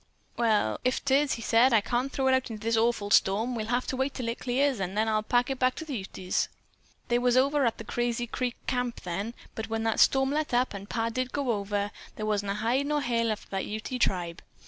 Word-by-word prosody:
"'Well, 215 - +1
if 255 +2 0
'tis,' 280 +1 +3
said 240 +3 +5
he, - - +7
'I - - +3
can't 245 +5 -1
throw 270 - -1
it 260 - +4
out 260 -1 +1
into 220 -1 -7
this 230 0 +2
awful 225 -3 +1
storm. 215 +6 +3
We'll 220 -2 -3
have 245 +2 0
to 260 - -3
keep 265 - +2
it 280 - -10
till 245 -3 -3
it 235 - -4
clears, 260 0 +1
an' 190 0 -3
then 220 +1 +2
I'll 215 -1 +2
pack 245 +4 +1
it 265 - -3
back 255 0 +2
to 320 - -6
the 290 -4 -4
Utes.' 190 -2 -2 0.6
"They 240 0 +3
was 245 0 +3
over 275 0 +3
at 230 - -1
the - - -7
Crazy 240 +1 -1
Creek 245 +1 -3
camp 250 -1 -2
then, 200 +7 -4 0.2
but 220 0 -5
when 225 0 -1
that 225 -1 0
storm 270 0 +4
let 300 -3 0
up, 250 -1 +2
and 200 0 -8
Pa 230 0 0
did 255 +2 -2
go 280 -4 0
over, 205 -1 -1 0.2
there 215 - -4
wa'n't 205 -2 0
a 200 - 0
hide 245 +7 0
or 295 0 +1
hair 235 -2 +1
left 215 -2 -1
of - - -21
that 195 -1 -2
Ute 220 +4 -4
tribe. 175 -3 0
235 Hz, 255 wpm, -28 LUFS, 215-255 Hz, 0.6 s, he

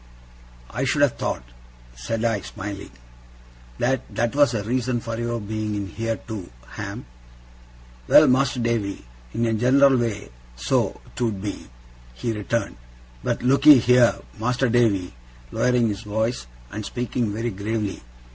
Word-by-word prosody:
'I 125 - -2
should 140 +3 +2
have 140 - +3
thought,' - - -4 0.4
said 110 - -3
I, 115 -3 +1
smiling, 100 +1 -7 0.9
'that 130 +1 -1
that 120 +3 0
was 145 -5 +4
a 105 - -1
reason 125 +2 0
for 115 0 -5
your 120 0 -2
being 105 0 -3
in 100 -1 -3
here 115 +2 -2
too, 105 -5 -8 0.2
Ham.' - - -6 1.0
'Well, - - +8
Mas'r 130 0 +2
Davy, 105 - -1 0.3
in 115 - +1
a 115 - +1
general 135 +4 +5
way, 105 - -3 0.2
so - - 0
't 125 - -2
would 110 -4 -1
be,' 100 +1 -5 0.5
he 85 - -2
returned; 105 - -2 0.5
'but - - -1
look'ee 140 +3 +7
here, 125 0 +5 0.2
Mas'r 125 +3 +1
Davy,' 110 -7 +2 0.4
lowering 125 -2 +2
his 100 -1 -4
voice, 110 - -2 0.2
and 105 - -5
speaking 120 0 -2
very 115 +3 -2
gravely. 105 0 -3
115 Hz, 145 wpm, -23 LUFS, 105-125 Hz, 1.0 s, Well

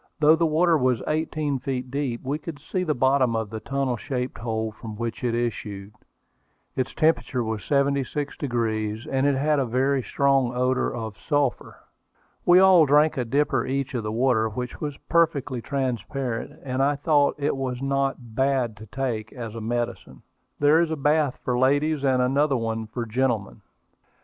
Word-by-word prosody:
Though 155 +1 +6
the 165 0 +2
water 165 +1 +3
was 125 -5 +1
eighteen 155 -2 -1
feet 125 -1 -4
deep, 135 -4 -2
we 140 +3 -2
could 160 -2 -7
see 160 +6 -4
to 180 - -1
the 155 -3 0
bottom 130 -2 +2
of 110 -2 -2
the 110 - -4
tunnel 135 +1 -2
shaped 125 0 -4
hole 110 -1 -2
from 110 0 -9
which 115 0 -4
it 120 -2 0
issued. 105 -4 -4 0.8
Its 130 - -1
temperature 155 -5 +1
was 110 -1 -3
76°, 130 -5 -1
and 135 +1 +2
it 140 - +2
had 150 +2 +2
a 135 - +1
very 135 +3 +1
strong 135 -2 +1
odor 125 +1 +1
of 110 -3 -6
sulphur. 145 -4 -1 0.7
We 175 - +7
all 185 -4 +7
drank 150 +2 +4
a 125 - 0
dipper 135 0 +1
each 135 0 -2
of 120 - -1
the 105 0 -4
water, 115 -1 +2
which 125 +3 -6
was 145 -2 -4
perfectly 145 -7 +1
transparent, 130 -2 -3
and 130 0 -2
I 145 +2 +3
thought 145 0 +2
it 145 -1 0
was 130 -2 -3
not 135 -3 -2
"bad 130 -4 +1
to 110 +1 -11
take" 115 -3 -3
as 115 -4 -7
a 115 - -6
medicine. 115 - -4 0.3
There 150 +3 +5
is 170 - +1
a 160 - -1
bath 150 -1 +1
for 125 -1 0
ladies, 145 +3 +2
and 130 -2 +3
another 135 +2 +2 0.3
for 120 -1 -3
gentlemen. 115 -3 -1
130 Hz, 175 wpm, -25 LUFS, 120-145 Hz, 0.8 s, We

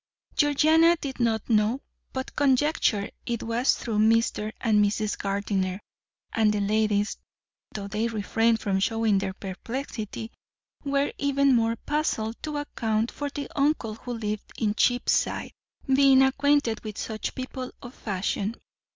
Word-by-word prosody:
Georgiana 315 +3 +5
did 270 -3 -5
not 225 -3 +1
know, 220 +2 +2 0.3
but 260 0 -5
conjectured 270 -6 +2 0.2
it 235 -1 -2
was 235 +3 +2
through 220 -4 -2
Mr. 220 -1 +2
and 210 -2 +3
Mrs. 210 +1 0
Gardiner; 195 -1 -1 0.5
and 220 -2 +3
the 210 - 0
ladies, 210 0 +1 0.5
though 200 -2 -5
they 215 +3 -1
refrained 225 +1 +1
from 195 -2 0
showing 220 0 +2
their 190 -1 -3
perplexity, 220 +2 -5 0.5
were 280 0 0
even 280 -1 +3
more 230 0 +2
puzzled 230 -5 -2
to 300 -1 -4
account 225 -6 -1
for 290 0 -4
the 285 -1 -5
uncle 280 -6 +1
who 245 +3 -7
lived 215 -2 -4
in 210 -2 +1
Cheapside 245 +3 +1 0.3
being 270 0 +6
acquainted 275 -3 +2
with 215 -2 -6
such 220 -1 -4
people 255 0 -5
of 245 - -9
fashion. 205 +1 -2
225 Hz, 135 wpm, -26 LUFS, 210-270 Hz, 0.5 s, being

